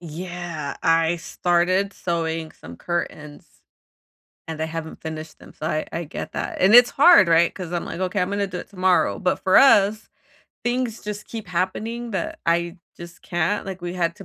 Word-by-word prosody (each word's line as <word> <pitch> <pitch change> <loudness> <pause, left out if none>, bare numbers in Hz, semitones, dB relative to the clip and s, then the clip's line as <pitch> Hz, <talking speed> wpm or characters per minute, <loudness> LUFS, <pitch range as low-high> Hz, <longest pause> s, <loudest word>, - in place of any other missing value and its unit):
Yeah, 170 -2 -6
I 165 +1 +3
started 180 +3 0
sewing 165 -3 -3
some 85 +2 -12
curtains, 150 - -5 1.0
and 160 -1 -5
I - - +1
haven't 160 0 -7
finished 160 0 -7
them, - - -15
so 155 - -7
I 155 0 -2
I 170 - -3
get 150 - -7
that. - - -4
And 195 +5 +6
it's 245 0 +8
hard, 295 - +7
right? 170 +1 +4
'Cause 180 -3 -7
I'm 175 - -2
like, - - -6
"Okay, 185 +1 -1
I'm 180 - -1
gonna 200 0 -1
do 180 -1 -6
it - - -10
tomorrow." 185 -2 +2
But 185 - 0
for 190 - +4
us, 215 -5 +5 0.6
things 240 -2 -2
just 210 0 -6
keep 225 -3 -7
happening, 220 +7 -3
that, 190 -4 -4
I 170 +1 0 0.2
just 170 0 -12
can't 175 +4 -1
like, 190 -1 -7
we 175 0 -5
had 170 -2 -1
to 195 - -11
175 Hz, 185 wpm, -23 LUFS, 165-195 Hz, 1.0 s, it's